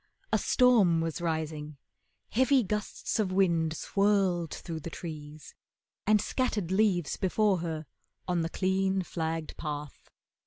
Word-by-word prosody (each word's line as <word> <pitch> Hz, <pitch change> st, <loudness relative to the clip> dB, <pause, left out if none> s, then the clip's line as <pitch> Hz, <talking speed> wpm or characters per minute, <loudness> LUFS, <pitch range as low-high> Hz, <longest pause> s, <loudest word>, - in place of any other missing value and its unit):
A -, -, +4 dB
storm 225 Hz, -10 st, +4 dB
was 165 Hz, +1 st, -2 dB
rising, 155 Hz, -3 st, -3 dB, 0.5 s
heavy 260 Hz, +2 st, +4 dB
gusts 210 Hz, +2 st, -3 dB
of 200 Hz, -4 st, +1 dB
wind 170 Hz, -4 st, +2 dB
Swirled 195 Hz, -4 st, +1 dB
through 165 Hz, -2 st, -5 dB
the 165 Hz, -, -6 dB
trees, 155 Hz, -2 st, -8 dB, 0.5 s
and 215 Hz, 0 st, +5 dB
scattered 210 Hz, -5 st, -1 dB
leaves 190 Hz, -6 st, +2 dB
before 195 Hz, 0 st, +2 dB
Her 160 Hz, -2 st, -4 dB, 0.4 s
on 180 Hz, -2 st, +1 dB
the 165 Hz, -, -1 dB
clean, 190 Hz, +1 st, +1 dB
flagged 160 Hz, -2 st, -3 dB
path. 150 Hz, -2 st, -6 dB
175 Hz, 125 wpm, -29 LUFS, 160-200 Hz, 0.5 s, and